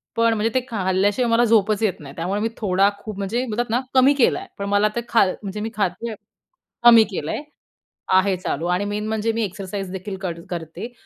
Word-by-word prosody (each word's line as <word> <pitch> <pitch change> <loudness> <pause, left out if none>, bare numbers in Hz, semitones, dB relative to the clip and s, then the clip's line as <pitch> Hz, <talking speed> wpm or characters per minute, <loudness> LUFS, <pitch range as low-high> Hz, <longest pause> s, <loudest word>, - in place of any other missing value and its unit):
पण 230 0 +3
म्हणजे 225 +1 0
ते 255 - +1
खाल्ल्याशिवाय 200 +3 +1
मला 235 +1 +4
झोपच 215 -1 +2
येत 205 -5 0
नाही. 140 -2 -10
त्यामुळे 185 +5 -2
मी 225 - 0
थोडा, 195 -1 +3
खूप 215 -2 -8
म्हणजे 215 +6 -1
म्हणतात 235 0 -2
ना, 240 +3 +1
कमी 265 +2 +6
केला 270 - +3
आहे. 390 - -10
पण 200 - -4
मला 205 +1 +3
ते 235 - 0
खाल 225 -5 +4
म्हणजे 200 0 -5
मी 220 - -3
खाते 205 +3 -2 0.7
कमी 230 -2 +9
केलाय 170 - -3 0.7
आहे 190 +1 +4
चालू 170 -3 -3
आणि 190 +3 0
मेन 210 +1 -3
म्हणजे 220 +1 0
मी 225 0 -1
एक्सरसाइज 195 -1 -5
देखील 190 +1 -5
कर 170 -3 -4
करते, 170 +7 -6
210 Hz, 200 wpm, -22 LUFS, 190-230 Hz, 0.7 s, कमी